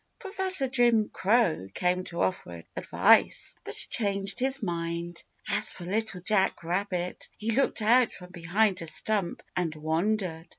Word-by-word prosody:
Professor 380 - +1
Jim 240 -4 +3
Crow 195 - +1
came 180 0 0
to 170 0 -2
offer 85 - -3
advice, - - +3
but - - -8
changed 200 -2 -2
his 265 0 0
mind. 170 -1 -4 0.2
As - - +4
for 175 - -10
Little 205 0 -2
Jack 190 -1 +1
Rabbit, 180 +1 -3
he 220 +2 -2
looked 240 -2 +1
out 240 +2 +4
from 180 -1 -12
behind 185 +3 0
a 165 - -5
stump 200 +2 -1
and 165 -3 -1
wondered. 165 +2 -2
190 Hz, 140 wpm, -28 LUFS, 170-220 Hz, 0.2 s, As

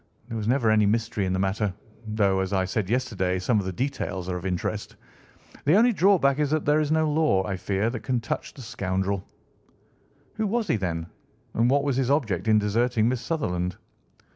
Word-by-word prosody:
There 115 - -5
was 105 -1 -3
never 120 -2 +3
any 105 -1 +4
mystery 110 -1 0
in - - -1
the - - 0
matter, 95 +2 0 0.4
though, 100 -3 +1
as 95 -1 -2
I 95 -1 +2
said 95 +1 -2
yesterday, 105 -7 0
some 105 +4 +1
of 95 - -3
the - - -1
details 100 -5 -3
are 90 - -1
of 90 +1 -4
interest. 90 -2 -3 0.7
The 150 +5 +4
only 235 +3 +5
drawback 175 -8 +3
is 150 -2 +1
that 155 0 0
there 150 +1 +4
is 150 -1 0
no 160 0 +3
law, 150 -11 +2
I 95 - -2
fear, 100 +4 -1
that 120 - -4
can 125 +1 -1
touch 115 - -4
the 135 - -9
scoundrel." 95 -2 -2 1.1
"Who 215 -1 0
was 225 +1 0
he, - - +3
then, 85 -5 -2 0.5
and 115 +2 +2
what 140 +1 +3
was 140 -3 0
his 135 -1 +1
object 110 - 0
in 110 -1 +5
deserting 110 +2 +1
Miss 125 -1 -2
Sutherland?" 90 - -2
110 Hz, 205 wpm, -25 LUFS, 95-140 Hz, 1.1 s, only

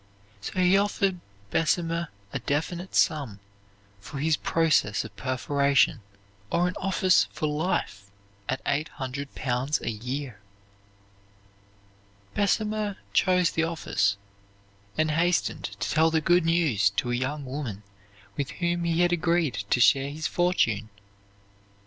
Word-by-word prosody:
So - - -6
he 185 +1 +4
offered 200 -2 0 0.3
Bessemer 165 0 +1 0.3
a - - -1
definite 170 +5 -3
sum 140 -11 +1 0.6
for 105 +8 -9
his 155 +2 +2
process 155 -12 +1
of 105 -2 -11
perforation, 140 +2 +1 0.5
or 175 +1 +2
an 180 - -2
office 185 -2 +3
for - - -3
life 150 - -2 0.4
at 130 - -2
eight 150 +2 0
hundred 140 +2 -6
pounds 130 +3 -1
a - - -3
year. 125 +1 -5 1.9
Bessemer 210 0 0 0.2
chose 180 -2 +3
the 165 - 0
office, 105 -11 0 0.8
and 155 0 +2
hastened 170 +3 +1
to - - -7
tell 160 0 +3
the 160 0 +2
good 175 +2 +3
news 155 - +3
to 120 +4 -2
a - - +1
young 135 +4 -2
woman 130 -7 -5 0.5
with 140 -2 -2
whom 175 -1 -1
he 170 0 +1
had 175 0 +3
agreed 165 - +1
to - - +3
share 135 +3 +4
his 155 +2 -6
fortune. 115 - +1
155 Hz, 130 wpm, -26 LUFS, 130-175 Hz, 1.9 s, he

